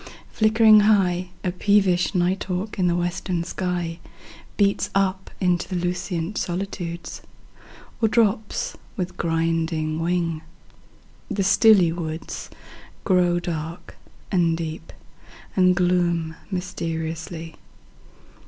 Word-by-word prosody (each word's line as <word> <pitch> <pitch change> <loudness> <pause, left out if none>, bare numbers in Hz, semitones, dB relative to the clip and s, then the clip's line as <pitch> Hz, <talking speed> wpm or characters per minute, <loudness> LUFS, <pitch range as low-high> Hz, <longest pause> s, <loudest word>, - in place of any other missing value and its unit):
Flickering 220 0 +6
high,5A 180 -3 +1
peevish 195 -2 +3
night 180 +2 +1
hawk 190 +3 -4
in 180 - +3
the 170 - +2
western 175 0 -1
sky6Beats 180 +3 -3
up 190 -1 0
into 180 -2 +1
the 185 - -3
lucent 175 +1 -2
solitudes,7Or 175 +4 -5
drops 215 -1 +1 0.2
with 180 -1 -3
griding 165 -1 0
wing. 165 -1 -1 0.9
The 195 - 0
stilly 195 -2 +5 1.1
woods8Grow 180 -3 +3
dark 165 0 -5 0.4
and 170 -3 +2
deep, 160 -1 -6 0.6
and 185 -1 +4
gloom 175 -3 +1 0.2
mysteriously. 165 -2 -4
180 Hz, 90 wpm, -23 LUFS, 170-195 Hz, 1.1 s, Flickering